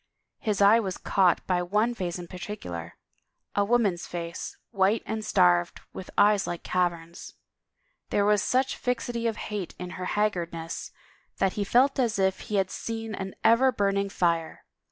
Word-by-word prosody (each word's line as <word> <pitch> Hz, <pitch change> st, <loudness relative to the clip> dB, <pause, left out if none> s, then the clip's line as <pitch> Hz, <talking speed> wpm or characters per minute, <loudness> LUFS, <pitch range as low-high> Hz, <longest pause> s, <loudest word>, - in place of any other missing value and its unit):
His 210 Hz, -4 st, +1 dB
eye 210 Hz, +3 st, +7 dB
was 190 Hz, -5 st, -3 dB
caught 185 Hz, -3 st, +2 dB
by 180 Hz, -1 st, +1 dB
one 210 Hz, +7 st, +1 dB
face 180 Hz, -6 st, -3 dB
in 175 Hz, -1 st, -8 dB
particular 125 Hz, -, -7 dB, 0.3 s
— -, -, -50 dB
a 205 Hz, -, +3 dB
woman's 200 Hz, -5 st, +1 dB
face, 170 Hz, -1 st, -6 dB
white 200 Hz, +1 st, +2 dB
and 220 Hz, 0 st, -3 dB
starved, 90 Hz, -, +3 dB
with 185 Hz, -, -8 dB
eyes 205 Hz, -1 st, +4 dB
like 175 Hz, -, -4 dB
caverns. 170 Hz, -2 st, -2 dB, 0.7 s
There 205 Hz, -, +2 dB
was 210 Hz, -1 st, +4 dB
such 260 Hz, +1 st, +1 dB
fixity 240 Hz, -1 st, -2 dB
of 225 Hz, -, -2 dB
hate 205 Hz, -5 st, -5 dB
in 180 Hz, 0 st, -6 dB
her 185 Hz, 0 st, -5 dB
haggardness 170 Hz, -6 st, -2 dB, 0.5 s
that 195 Hz, -, +1 dB
he 205 Hz, -, -1 dB
felt 260 Hz, +7 st, +3 dB
as 235 Hz, -5 st, +1 dB
if 190 Hz, -1 st, +1 dB
he 210 Hz, -, -5 dB
had 190 Hz, -2 st, +1 dB
seen 225 Hz, -1 st, -5 dB
an 190 Hz, -1 st, -5 dB
ever 255 Hz, +3 st, +5 dB
burn 200 Hz, -3 st, +1 dB
ing 200 Hz, 0 st, 0 dB
fire. 170 Hz, -4 st, -1 dB
195 Hz, 170 wpm, -27 LUFS, 175-220 Hz, 0.7 s, eye